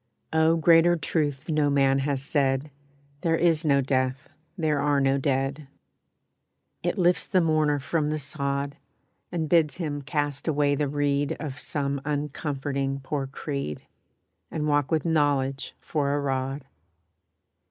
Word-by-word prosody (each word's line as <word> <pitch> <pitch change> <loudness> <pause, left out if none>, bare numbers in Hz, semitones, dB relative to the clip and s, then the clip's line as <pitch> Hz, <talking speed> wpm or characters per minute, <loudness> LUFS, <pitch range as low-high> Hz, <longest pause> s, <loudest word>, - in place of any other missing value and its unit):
Oh, 160 +1 +4
greater 165 +2 +5
truth 150 -2 -2
no 150 -2 +2
man 135 -1 +3
has 135 -1 -1
said, 140 0 0 0.5
"There 165 -1 +2
is 165 -1 +2
no 140 -3 +3
death, 130 0 -1 0.3
there 155 -4 +1
are 145 0 +2
no 135 0 +2
dead." 135 +1 -1 1.1
It 175 +4 -1
lifts 180 -1 +2
the 185 - +3
mourner 155 -3 +2
from 150 +2 -1
the 155 - -1
sod, 140 0 -3 0.5
And 165 -3 -1
bids 160 -2 +3
him 150 -5 -3
cast 145 0 -2
away 145 -2 +2
the 145 +1 0
reed 145 0 0
Of 145 -3 -5
some 140 -3 -2
uncomforting 140 -2 -2
poor 135 +1 -3
creed, 140 - -5 0.7
And 150 -1 -2
walk 145 -2 +2
with 160 -1 0
Knowledge 140 -4 0
for 145 -2 -1
a - - 0
rod. 135 0 -2
145 Hz, 140 wpm, -26 LUFS, 140-155 Hz, 1.1 s, greater